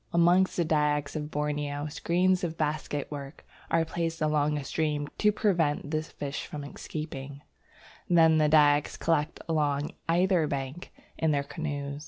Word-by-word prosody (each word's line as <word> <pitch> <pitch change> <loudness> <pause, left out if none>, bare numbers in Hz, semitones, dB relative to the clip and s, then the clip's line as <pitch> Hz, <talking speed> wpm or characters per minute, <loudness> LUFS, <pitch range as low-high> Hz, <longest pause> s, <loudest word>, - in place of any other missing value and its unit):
Amongst 175 +2 +4
the 170 - +2
Dyaks 150 -2 +1
of 150 -1 -3
Borneo, 145 -1 -2
screens 180 +5 +1
of 165 -2 -3
basketwork 150 -2 -4 0.2
are 165 0 +2
placed 165 0 -3
along 150 -1 +1
a 145 - -4
stream 150 0 -1
to 210 - +4
prevent 170 -9 0
the 155 -1 +1
fish 145 -2 -6
escaping. 145 -1 -6 0.7
Then 160 -2 +5
the 150 -1 +3
Dyaks 150 -1 +4
collect 160 -2 0
along 150 -2 0 0.2
either 175 -1 +3
bank 140 +4 -5 0.3
in 160 - +2
their 145 -2 +1
canoes. 145 -2 -4
150 Hz, 140 wpm, -28 LUFS, 145-165 Hz, 0.7 s, Then